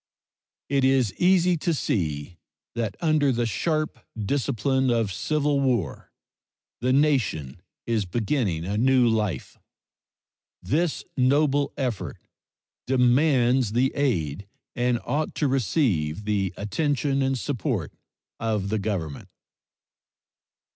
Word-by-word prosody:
It 140 Hz, -1 st, +1 dB
is 130 Hz, -6 st, +3 dB
easy 180 Hz, -1 st, +4 dB
to 165 Hz, +1 st, 0 dB
see 80 Hz, -, -2 dB, 0.3 s
that 115 Hz, -4 st, -2 dB
under 155 Hz, -4 st, +3 dB
the 120 Hz, -1 st, 0 dB
sharp 155 Hz, -, -1 dB, 0.2 s
discipline 130 Hz, +3 st, 0 dB
of 115 Hz, -5 st, +1 dB
civil 145 Hz, -, 0 dB
war 120 Hz, -, -1 dB, 0.7 s
the 125 Hz, +2 st, +1 dB
nation 110 Hz, -, +1 dB, 0.2 s
is 115 Hz, -3 st, 0 dB
beginning 100 Hz, -, -1 dB
a 100 Hz, +3 st, -1 dB
new 130 Hz, 0 st, +4 dB
life. 105 Hz, -, -1 dB, 1.0 s
This 160 Hz, +2 st, -1 dB
noble 140 Hz, +2 st, +2 dB
effort 105 Hz, -, -3 dB, 0.7 s
demands 125 Hz, -2 st, +3 dB
the 130 Hz, +3 st, +2 dB
aid 100 Hz, -, -1 dB, 0.3 s
and 120 Hz, -1 st, +1 dB
ought 150 Hz, +5 st, -1 dB
to 150 Hz, -, +1 dB
receive 105 Hz, -, 0 dB
the 100 Hz, -3 st, 0 dB
attention 140 Hz, +5 st, 0 dB
and 135 Hz, 0 st, +1 dB
support 125 Hz, 0 st, -2 dB, 0.5 s
of 105 Hz, -3 st, -1 dB
the 110 Hz, +1 st, 0 dB
Government. 95 Hz, -8 st, -4 dB
125 Hz, 105 wpm, -25 LUFS, 100-140 Hz, 1.0 s, easy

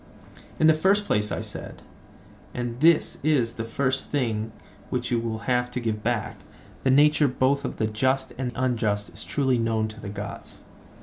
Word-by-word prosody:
In 155 Hz, -, +3 dB
the 160 Hz, -, +7 dB
first 195 Hz, +6 st, +2 dB
place, 105 Hz, -, 0 dB
I -, -, -2 dB
said—and 120 Hz, -1 st, -9 dB
this 160 Hz, +2 st, +4 dB
is 135 Hz, -6 st, +2 dB
the 115 Hz, -, -4 dB
first 130 Hz, +3 st, -1 dB
thing 115 Hz, -6 st, -1 dB, 0.4 s
which -, -, -2 dB
you 120 Hz, -, +2 dB
will 115 Hz, -1 st, -3 dB
have 125 Hz, -1 st, +1 dB
to 125 Hz, -, -3 dB
give 110 Hz, -3 st, -2 dB
back—the 120 Hz, +3 st, -4 dB
nature 145 Hz, +2 st, +5 dB
both 130 Hz, +2 st, +1 dB
of -, -, -4 dB
the 110 Hz, -, +1 dB
just 130 Hz, +5 st, 0 dB
and 125 Hz, -1 st, -3 dB
unjust 110 Hz, -5 st, 0 dB
is -, -, -7 dB
truly 130 Hz, -4 st, +1 dB
known 110 Hz, -1 st, +1 dB
to 110 Hz, +1 st, -10 dB
the 105 Hz, -, -6 dB
gods. 100 Hz, +1 st, -7 dB
125 Hz, 170 wpm, -25 LUFS, 110-135 Hz, 0.4 s, the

